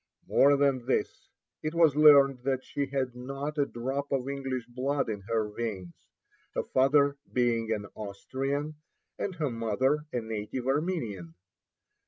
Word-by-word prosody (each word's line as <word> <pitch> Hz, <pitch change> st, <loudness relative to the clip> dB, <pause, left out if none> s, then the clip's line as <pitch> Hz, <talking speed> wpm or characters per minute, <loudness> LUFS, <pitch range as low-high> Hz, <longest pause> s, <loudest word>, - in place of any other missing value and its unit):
More 140 Hz, +1 st, +5 dB
than 135 Hz, -3 st, +1 dB
this, 130 Hz, -, -1 dB, 0.3 s
it 155 Hz, +2 st, -3 dB
was 165 Hz, -4 st, +5 dB
learned 140 Hz, -3 st, +7 dB
that 130 Hz, -1 st, 0 dB
she 140 Hz, -1 st, -3 dB
had 135 Hz, -2 st, -2 dB
not 140 Hz, +4 st, -5 dB
a 140 Hz, -, +2 dB
drop 135 Hz, +4 st, -4 dB
of 135 Hz, -2 st, 0 dB
English 135 Hz, -3 st, -3 dB
blood 130 Hz, +4 st, -1 dB
in 105 Hz, -3 st, -4 dB
her 110 Hz, -2 st, +1 dB
veins, 95 Hz, -7 st, -5 dB, 0.5 s
her -, -, 0 dB
father 140 Hz, +2 st, +3 dB
being 115 Hz, -2 st, +1 dB
an 105 Hz, -2 st, -1 dB
Austrian, 135 Hz, +9 st, -4 dB, 0.4 s
and 190 Hz, -, -3 dB
her 150 Hz, -6 st, -1 dB
mother 130 Hz, +7 st, 0 dB
a 120 Hz, -, -1 dB
native 110 Hz, +3 st, -4 dB
Armenian. 130 Hz, -, -2 dB
135 Hz, 145 wpm, -29 LUFS, 115-140 Hz, 0.5 s, learned